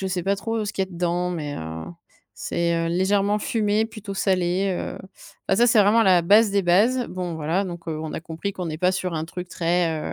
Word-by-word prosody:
je 190 - -2
sais 185 -1 -2
pas 195 +3 +1
trop, 225 +3 -3
heu, 215 - -1
ce 205 - -4
qu'il 190 - 0
y - - -19
dedans 175 0 -1
mais, 150 -4 -4
heu, 80 0 -6 0.5
c'est, 170 0 -1
heu, 165 0 0
légèrement 195 +4 +1
fumé, 215 0 0
plutôt 215 -3 -8
salé, 185 0 +1
heu. - - -5 0.5
Bah, 190 - +3
ça, 240 +3 +5
c'est 230 -2 +5
vraiment 210 +3 +5
la 185 -4 +5
base 210 +5 +5
des 200 0 +1
bases. 220 +9 +3
Bon, 180 -2 -4
voilà, 160 +5 -1
donc, 170 -2 -7
heu, 155 -1 -3
on 160 -1 -5
a - - -4
compris 165 +4 -5
qu'on 185 -3 -5
n'est 155 -1 -5
pas 180 +2 +2
sur 185 -2 -2
un 155 0 -2
truc 180 +2 -7
très, 170 -2 0
180 Hz, 235 wpm, -23 LUFS, 170-200 Hz, 0.5 s, ça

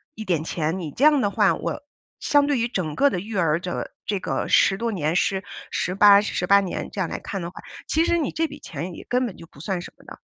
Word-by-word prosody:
一 220 - -7
点 170 -5 0
钱， 165 +1 -2
你 160 -4 -5
这 275 - +1
样 295 -3 +5
的 205 - +1
话 205 -1 +3
我 - - -4 0.4
相 290 -1 +3
对 285 -4 +1
于 235 - +1
整 175 -10 -3
个 285 0 +4
的 180 - -2
育 215 +1 -7
儿 165 -2 +2
这 180 0 -4 0.2
这 205 -2 -1
个 - - -2
10 190 - +4
多 230 +1 -2
年， 160 -4 -1
10 190 +1 +1 0.3
18 200 +2 +5
18 200 -1 +3
年 185 - -4
这 200 - -7
样 170 - -1
来 - - -4
看 195 - -5
的 170 - -4
话， - - -11 0.3
其 320 +2 +2
实 340 - +2
你 300 -5 -1
这 325 0 0
笔 290 0 -11
钱 170 +4 -6
也 - - -10
根 250 +1 +2
本 210 -7 -6
就 165 - -11
不 145 - -18
算 180 0 -2
什 - - -10
么 - - -20
的。 - - -11
195 Hz, 255 characters per minute, -23 LUFS, 175-240 Hz, 0.4 s, 样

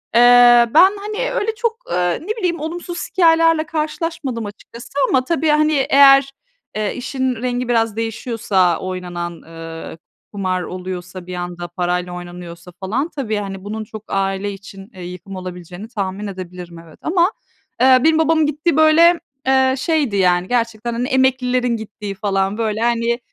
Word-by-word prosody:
Eee, 240 0 +7
ben, 375 +4 +8
hani, 430 +5 -3
öyle 445 -2 -1
çok, 460 0 -1
eee, 180 -1 0
ne - - -12
bileyim, 350 -5 -1
olumsuz 345 +2 -5
hikâyelerle 330 -3 +4
karşılaşmadım 305 -5 -3
açıkçası. 230 +4 -11 0.2
Ama 255 -1 +2
tabii, 320 +1 0
hani, 305 +1 +3 0.2
eğer, 275 0 +6 0.4
eee, 215 -1 -1
işin 260 0 -2
rengi 245 +1 -2
biraz 225 -3 +1
değişiyorsa, 225 -5 0
oynanan, 175 -2 -5
eee, 165 0 -9 0.4
kumar 185 -2 -1
oluyorsa 185 0 -7
bir 180 - -5
anda 175 0 -5
parayla 180 0 -2
oynanıyorsa 175 0 -9
falan 240 - -2
tabii, 230 -7 -2
hani, 195 -2 -5
bunun 215 +2 -5
çok 215 0 -10
aile 195 +1 -1
için, 195 0 -12
eee, 185 -2 -10
yıkım 180 +2 -8
olabileceğini 180 +2 -8
tahmin 200 -2 -4
edebilirim, 180 -3 -8
evet. 165 -2 -16
Ama, 350 +3 +2 0.5
eee, 255 0 +6
benim 320 0 +4
babamın 320 -1 +3
gittiği 300 +2 0
böyle, 330 +2 +6 0.3
eee, 265 0 +3
şeydi, 285 -5 0
yani, 180 -1 +2
gerçekten, 235 -1 -1
hani, 240 +2 -2
emeklilerin 255 -2 +1
gittiği 210 -2 -7
falan 195 0 -1
böyle, 220 -1 -1
hani, 235 0 +1
225 Hz, 150 wpm, -19 LUFS, 185-280 Hz, 0.5 s, ben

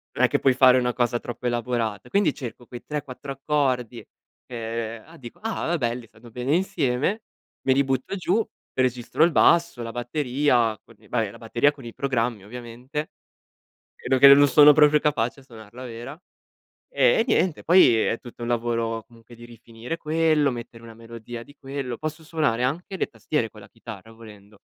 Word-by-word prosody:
non - - +1
è - - +3
che - - +1
puoi 135 - +3
fare 130 0 +6
una 125 -1 0
cosa 120 -1 0
troppo 120 +1 -6
elaborata. 120 -3 -2
Quindi, 195 -4 +2
cerco 120 -1 -8
quei 120 -1 -10
3, 150 -1 -4
4 135 +1 -9
accordi 130 -4 -1 0.4
che 115 -1 -5
ah, 165 +1 -16
dico: 120 -5 -12
"Ah, 205 -6 -2
belli. 120 -3 -2
Stanno 115 +2 -17
bene 125 +6 -1
insieme." 180 - -1 0.4
Me 130 - +4
li 140 +1 +3
butto 135 +7 -2
giù, 195 +4 0 0.3
registro 125 +3 0
il 170 - +1
basso, 170 -4 +3
la 115 - -5
batteria 125 -2 0
con - - -19
i - - -21
beh, - - -1
la - - -13
batteria 145 +5 +1
con 140 - -14
i 115 - -8
programmi 120 -6 -2
ovviamente. 125 +6 -7 0.9
Vedo 130 +1 +1
che 140 +1 +10
non 145 +1 +6
sono 150 +2 +8
proprio 150 0 +5
capace 125 -4 0
a - - -19
suonarla 115 -1 -12
vera. 120 +5 -8 0.8
E - - +3
niente, 180 -5 +1
poi 175 -8 +6
è 115 - 0
tutto 120 -1 -12
un 120 - -3
lavoro 115 -1 -1
comunque 115 0 -17
di 120 - -13
rifinire 120 +4 -8
quello, 155 -2 +2
mettere 120 -1 -8
una 115 -1 -12
melodia 115 +1 -9
di 145 - -17
quello 135 -3 -5
posso 155 +1 -6
suonare 150 -7 0
anche 170 +9 -3
le - - -1
tastiere 150 -7 -2
con 110 - -15
la 100 - -14
chitarra 110 -1 -11
volendo 105 -2 -15
125 Hz, 180 wpm, -24 LUFS, 115-150 Hz, 0.9 s, che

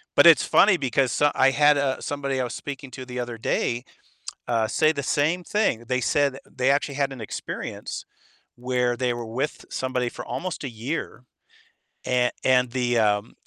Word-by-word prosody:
but - - +7
it's 165 - +7
funny 200 -1 +5
because 135 -2 +1
so 145 0 +3
I 135 0 +4
had, 145 +1 +4
uh, 140 -2 0
somebody 140 -2 -2
I - - 0
was 125 - -4
speaking 135 -2 -7
to 130 +1 -8
the 125 0 -6
other 120 -2 -4
day, 120 +2 -1 0.6
uh, 115 -2 +1
say 155 +7 +3
the 140 -3 -4
same 155 +6 +1
thing, 200 - 0
they 125 0 0
said 140 +1 +1
they 130 +1 +2
actually 140 0 0
had 140 -1 0
an 125 - -9
experience 110 - -6 0.5
where 125 0 0
they 125 -1 0
were 120 -1 -5
with 130 +7 -3
somebody 130 -2 -2
for - - -8
almost 185 -4 -4
a 135 - -3
year, 125 +4 -5 0.8
an 125 -1 +2
and 125 -2 +3
the, 125 -1 0
um 105 0 +1
130 Hz, 185 wpm, -24 LUFS, 120-145 Hz, 0.8 s, but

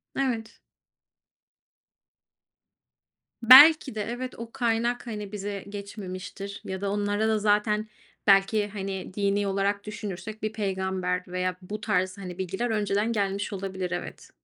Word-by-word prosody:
Evet. 240 -5 -2 2.8
Belki 270 +2 +9
de, 215 - -2
evet, 245 +3 -5
o 230 0 -7
kaynak, 240 -1 0
hani, 210 -3 -5
bize 200 -1 -5
geçmemiştir 200 -1 -7
ya 190 0 -5
da 200 -1 -1
onlara 205 +1 0
da 220 -1 +2
zaten 210 +1 +1 0.4
belki, 200 +1 +4
hani, 195 -2 -5
dini 200 0 0
olarak 200 +1 0
düşünürsek 210 0 -7
bir 215 - -2
peygamber 190 -3 -2
veya 180 0 -2
bu 205 +4 -7
tarz, 185 -2 0
hani, 180 -3 -7
bilgiler 190 +6 -2
önceden 210 0 0
gelmiş 200 -2 -1
olabilir, 190 -2 -4
evet. - - -6
205 Hz, 125 wpm, -27 LUFS, 195-220 Hz, 2.8 s, Belki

